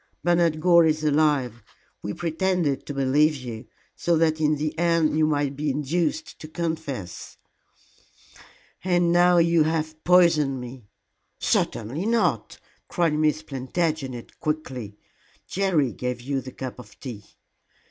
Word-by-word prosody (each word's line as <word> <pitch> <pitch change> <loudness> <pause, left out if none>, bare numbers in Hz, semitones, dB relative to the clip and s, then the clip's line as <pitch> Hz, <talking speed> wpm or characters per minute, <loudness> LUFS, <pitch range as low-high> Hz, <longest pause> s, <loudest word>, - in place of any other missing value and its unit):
Bernard 170 -2 +2
Gore 170 0 +5
is 155 0 0
alive. 145 -6 +1 0.4
We 105 - -5
pretended 170 -3 -1
to 145 - -4
believe 145 +3 +3
you, 120 -3 -8 0.3
so 170 -1 +1
that 160 -1 +1
in 155 0 +3
the 150 +1 -3
end 165 -3 +2
you 155 0 +3
might 145 -2 0
be 150 +1 -2
induced 165 - -2
to 155 - -9
confess." 160 - -5 1.5
"And 175 -2 +2
now 175 0 +5
you 170 -1 +4
have 155 0 -1
poisoned 165 -7 +4
me." 125 -2 -9 0.5
"Certainly 145 - -1
not," 180 - 0 0.3
cried 170 -3 +1
Miss 155 0 +1
Plantagenet, 135 -2 -3
quickly. 130 -9 -4 0.5
"Jerry 175 -9 +1
gave 125 -1 -4
you 135 +2 -3
the 130 - -9
cup 130 0 -7
of 110 -4 -14
tea." 115 -6 -8
155 Hz, 130 wpm, -24 LUFS, 135-170 Hz, 1.5 s, Gore